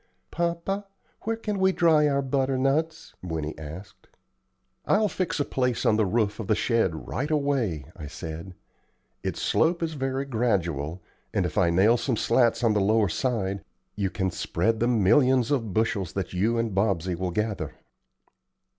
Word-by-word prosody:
"Papa, 170 +4 -2 0.4
where 225 +1 0
can 210 -3 -3
we 190 0 +4
dry 160 -4 +4
our 140 -1 +1
butternuts?" 135 +4 0
Winnie 80 -4 -3
asked. 80 +4 -10 0.8
"I'll 210 +1 +3
fix 185 -5 -2
a 145 - +1
place 125 -2 -1
on 105 - +4
the 110 -2 +2
roof 110 +1 0
of 110 - -4
the 110 - +3
shed 105 -8 0
right 145 +4 -2
away," 135 - 0
I 75 -5 -8
said. 80 +5 -7 0.7
"Its - - -3
slope 170 +1 +2
is 160 -1 -2
very 135 -1 -2
gradual, 95 - -1 0.3
and - - +2
if - - -4
I 85 - +3
nail 100 +8 +4
some 120 0 -1
slats 120 +1 +2
on 115 -2 +4
the 105 - +2
lower 105 0 +3
side 100 -7 -1 0.3
you 100 -2 -1
can 95 0 -1
spread 110 +8 0
the 120 - +2
millions 125 +3 +3
of 115 -7 0
bushels 100 -5 0
that 95 -2 -3
you 110 +6 +1
and 115 -3 -1
Bobsey 95 -3 +1
will 90 +1 -2
gather." 100 -5 -2
115 Hz, 165 wpm, -26 LUFS, 95-140 Hz, 0.8 s, we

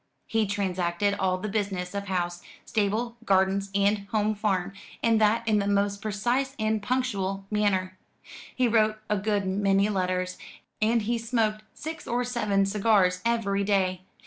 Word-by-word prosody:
He 225 -2 0
transacted 190 -1 0
all 185 -1 +1
the 210 - -4
business 195 -3 -2
of 200 0 -4
house, 175 -2 -2 0.2
stable, 220 +3 -1
gardens, 195 0 +2
and 200 0 +2
home 215 0 +1
farm, 200 -3 -1 0.3
and 225 -1 +3
that 225 +2 +2
in 215 -1 +3
the 200 - -1
most 200 0 +1
precise 240 +6 -1
and 220 -1 0
punctual 200 -5 -1
manner. 190 -3 0 0.6
He 255 -1 +2
wrote 215 -1 +3
a 210 - +3
good 205 -1 0
many 195 +1 +2
letters, 185 -2 -1 0.4
and 225 +1 +2
he 235 +2 0
smoked 225 -2 0
six 320 +1 -7
or 245 +1 0
seven 210 -5 +1
cigars 195 -3 +2
every 200 -4 +1
day. 190 -2 +1
205 Hz, 150 wpm, -27 LUFS, 195-220 Hz, 0.6 s, and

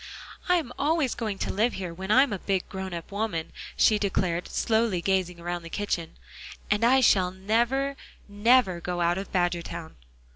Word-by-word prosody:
"I'm 340 -9 +2
always 300 -3 +1
going 215 -4 -3
to - - -2
live 225 +4 +1
here 180 -3 -5
when 190 +3 -7
I 255 +5 +7
am 265 -7 -2
a 195 - -3
big, 190 -1 -1
grown 190 -1 -6
up 170 +1 -7
woman," 200 -6 -3 0.3
she 215 -1 +4
declared, 180 -4 -1
slowly 220 -4 +1
gazing 180 -1 0
around 175 0 -4
the 165 - -10
kitchen, 170 -4 -3 0.5
"and 210 +2 +2
I 260 +3 +5
shall 190 -6 +4
never, 235 +9 0 0.3
never 205 -3 +3
go 175 0 -3
out 175 +2 +2
of 195 - -7
Badgertown." 175 -2 -2
195 Hz, 175 wpm, -27 LUFS, 175-230 Hz, 0.5 s, I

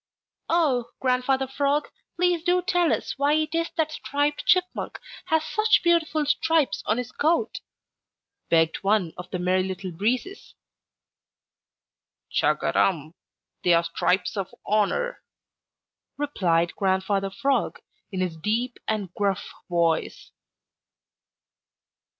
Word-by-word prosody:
"Oh, 295 -8 +2
Grandfather 260 +1 +1
Frog, 280 +2 0 0.3
please 355 -1 +1
do 360 +1 +2
tell 355 -3 +2
us - - -1
why 285 +1 +3
it 310 0 0
is 330 0 0
that 315 -1 +1
Striped 290 0 -2
Chipmunk 365 0 +1 0.3
has 320 -1 +1
such 430 0 +3
beautiful 325 -3 +2
stripes 295 -4 +1
on 215 - +2
his 250 0 -4
coat," 335 +7 0 0.9
begged 165 -1 +3
one 195 -4 +1
of 180 - -9
the 185 - -3
Merry 180 +1 +1
Little 185 0 -4
Breezes. 245 - -2 1.8
"Chug - - +1
a - - +1
rum! 160 -4 +1 0.5
They 175 -1 +5
are 170 - +3
stripes 180 +3 0
of 195 -3 -3
honor," 350 - 0 1.0
replied 175 - 0
Grandfather 195 0 0
Frog, 275 +8 0 0.3
in 190 -2 -2
his 180 -3 -1
deep, 230 +8 -1 0.4
gruff 200 -2 -1 0.2
voice. 170 -2 0
250 Hz, 115 wpm, -25 LUFS, -, 1.8 s, They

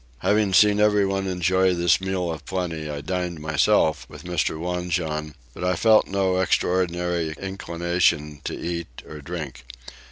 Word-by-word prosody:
Having 105 -2 +2
seen 105 +1 +5
everyone 100 -2 +2
enjoy 95 0 +2
this 85 +1 +3
meal 95 -2 -2
of 80 -2 -7
plenty 85 -4 -4
I 75 -1 -4
dined 90 +1 -3
myself 75 -2 +2
with - - -11
Mr. 85 -3 -1
Wanjon; 85 -3 -2 0.2
but - - -8
I 90 0 +1
felt 110 +4 +4
no 95 -1 0
extraordinary 90 -3 0
inclination 85 -5 -1
to - - -4
eat 85 -7 -5
or 75 -1 -9
drink. 75 -6 -6
90 Hz, 140 wpm, -24 LUFS, 80-95 Hz, 0.2 s, seen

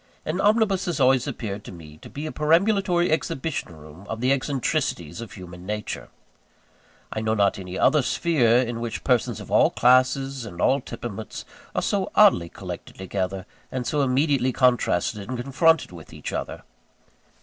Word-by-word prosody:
An 170 +5 -1
omnibus 210 -3 +2
has 175 -3 -2
always 130 0 +4
appeared 105 -6 -5
to - - -8
me, 80 -4 -12
to - - -12
be 145 +2 -6
a 155 - -4
perambulatory 175 +2 +2
exhibition 155 - -2
room 80 +6 -13
of 110 - -4
the 125 +2 +2
eccentricities 130 - -1
of 115 - -9
human 90 -2 -10
nature. 105 +2 -5 1.0
I 110 - -3
know 110 0 0
not 100 -2 +2
any 90 0 -6
other 150 +2 +4
sphere 125 -5 +2
in 120 -1 -4
which 115 -1 -4
persons 125 -4 +1
of - - -10
all - - +5
classes 130 +1 +3
and 90 -6 -9
all 135 +8 +3
temperaments 115 -3 -7 0.3
are - - 0
so - - 0
oddly 85 -1 +5
collected - - -8
together, 95 0 -3 0.3
and 130 -2 -3
so 150 +3 0
immediately 135 -1 +2
contrasted 115 -4 +1
and 130 - -3
confronted 145 - +2
with 85 -3 -12
each - - -6
other. - - -5
125 Hz, 165 wpm, -24 LUFS, 100-145 Hz, 1.0 s, all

